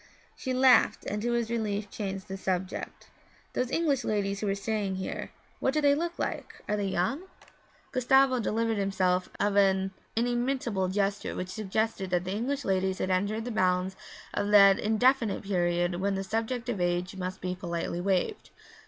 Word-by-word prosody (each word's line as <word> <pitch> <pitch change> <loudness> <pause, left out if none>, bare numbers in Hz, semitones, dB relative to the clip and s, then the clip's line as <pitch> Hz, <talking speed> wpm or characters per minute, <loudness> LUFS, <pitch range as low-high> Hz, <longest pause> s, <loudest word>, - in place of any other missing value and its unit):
She 260 - -4
laughed 255 0 +4
and 210 +1 -2
to 240 +2 0
his 235 -1 0
relief 210 -3 -2
changed 195 -2 -4
the 195 - -5
subject. 190 -1 -4 0.4
'Those 250 - -1
English 285 -3 +1
ladies 200 -2 -1
who 210 - -2
are 195 - +1
staying 200 -1 -2
here 190 - -4 0.3
what 265 - 0
do - - +3
they 285 -1 +5
look 340 +4 -2
like? - - -4
Are 210 - +1
they 205 -1 -1
young?' 230 - -1 0.6
Gustavo 260 +1 +4
delivered 225 -1 0
himself 185 -2 +1
of 205 -1 +1
an 195 -1 +3 0.2
inimitable 240 -4 0
gesture 200 +1 -1
which 185 - -4
suggested 215 -1 -2
that 180 -1 +1
the 185 - -4
English 265 +6 -2
ladies 190 0 +1
had 185 - -1
entered 205 +4 0
the 245 - -3
bounds 185 -2 +1 0.4
of 205 - -1
that 200 -2 +7
indefinite 230 +1 +2
period 175 -2 0
when 200 0 +1
the 195 - -2
subject 225 +4 -2
of 220 -7 -2
age 175 +1 0
must 185 0 -4
be 180 0 -2
politely 175 -1 -3
waived. 195 - -1
200 Hz, 170 wpm, -29 LUFS, 190-235 Hz, 0.6 s, that